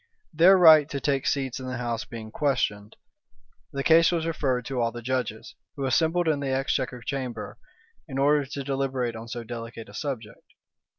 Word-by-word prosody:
Their 175 +5 +6
right 160 -4 +7
to 140 - -3
take 140 -1 0
seats 135 -2 -1
in 130 - -7
the 130 0 -4
house 120 -2 -3
being 110 -2 -9
questioned, 110 -8 -1 0.8
the 140 0 -3
case 165 +2 +5
was 165 -2 -1
referred 135 -7 -1
to 130 -2 -2
all 115 0 +1
the 120 +1 -8
judges, 125 -3 -3 0.2
who 140 - -3
assembled 160 +6 +2
in 155 -3 +2
the 140 -1 -3
exchequer 130 -2 -1
chamber, 125 -5 -5 0.5
in 135 -3 -6
order 145 +1 +3
to 140 +1 -5
deliberate 135 -3 -2
on 115 +1 -8
so 120 0 -6
delicate 115 -1 -8
a - - -13
subject. 125 -7 -6
130 Hz, 180 wpm, -26 LUFS, 120-145 Hz, 0.8 s, right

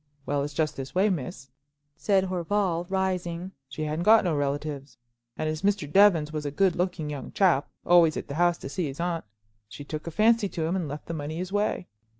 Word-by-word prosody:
"Well, 145 0 0
it's 145 0 -4
just 155 0 0
this 135 +3 -7
way, 200 +3 +3
miss," 140 -4 -5 0.4
said 195 -2 +2
Horval, 180 -1 -1
rising. 185 -2 -2 0.2
"She 155 - -5
hadn't 155 +2 -2
got 215 +4 +6
no 175 -4 0
relatives; 145 -1 -3 0.4
and 155 - -1
as 155 0 -2
Mr. 200 -6 +1
Jevons 165 -3 +4
was 155 -1 -3
a 145 - -2
good 185 +4 +2
looking 175 -4 -2
young 140 -3 -6
chap, 175 -8 +3 0.2
always 170 -3 +5
at - - -5
the 140 - -5
house 175 +2 +2
to - - -7
see 170 +2 -2
his 135 +2 -7
aunt, 170 -1 -2 0.4
she 145 - -9
took 155 +2 -6
a - - 0
fancy 215 +4 +3
to 165 - -3
him 170 +3 0
and 180 -5 -2
left 145 +1 -7
the 165 - -5
money 155 0 -4
his 180 +1 -4
way." 205 -2 0
170 Hz, 215 wpm, -27 LUFS, 150-185 Hz, 0.4 s, got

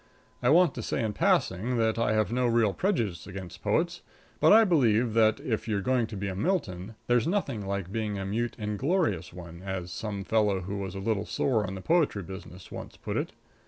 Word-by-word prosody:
I 125 - +3
want 170 0 +5
to 120 - -5
say 115 - -2
in 110 -2 -1
passing 105 +6 +1
that 115 0 +1
I 110 -2 +2
have 110 0 +1
no 125 +1 +1
real 115 -4 +3
prejudice 115 - -1
against 95 -2 -8
poets, 170 +11 0 0.4
but - - +5
I 225 +2 +8
believe 120 - +3
that, 110 -1 +4
if 110 -2 -2
you're 105 -2 0
going 125 0 +1
to 105 - -7
be 100 +1 -3
a 95 - -3
Milton, 105 - -2
there's 120 +3 +2
nothing 140 - -1
like 100 -2 -3
being 105 -2 -2
a 95 - -3
mute, 115 +5 -2
inglorious 105 - 0
one, 85 -1 -10
as 95 -2 -4
some 100 0 -4
fellow 105 -3 +2
who 100 +3 -4
was 95 -1 -5
a - - -4
little 105 0 -1
sore 110 -7 +1
on 95 - -5
the 95 - -6
poetry 155 - +2
business 90 -1 -10
once - - -8
put - - -5
it. - - -2
110 Hz, 210 wpm, -28 LUFS, 95-120 Hz, 0.4 s, I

